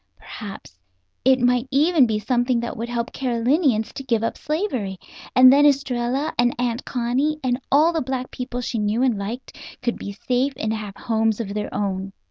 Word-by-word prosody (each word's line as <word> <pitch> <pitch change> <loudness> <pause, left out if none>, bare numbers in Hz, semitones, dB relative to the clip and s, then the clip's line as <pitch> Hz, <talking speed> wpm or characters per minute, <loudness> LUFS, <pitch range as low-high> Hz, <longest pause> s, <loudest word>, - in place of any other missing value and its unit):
Perhaps 195 - -10 0.4
it 260 0 +5
might 245 +1 +2
even 290 0 +4
be 215 -1 0
something 245 +3 +1
that 235 - -4
would 230 +2 -5
help 235 0 -3
Carolinians 250 -1 +1
to 275 - -7
give 230 -4 0
up 230 - -1
slavery; 295 - -2 0.4
and 255 +1 +9
then 285 +1 +5
Estralla 270 0 +1
and 240 0 +3
Aunt 240 0 -1
Connie, 260 +5 0
and 250 0 0
all 310 +5 +5
the 325 - 0
black 255 0 -3
people 250 0 -5
she 235 -1 -3
knew 210 +4 +1
and 255 -4 +3
liked, 215 +6 -6 0.3
could 240 -1 -1
be 200 - -6
safe 255 +6 0
and 220 0 -1
have 210 -3 -6
homes 225 -2 0
of 200 -3 -4
their 210 0 -3
own. 195 -1 -3
245 Hz, 185 wpm, -22 LUFS, 220-265 Hz, 0.4 s, and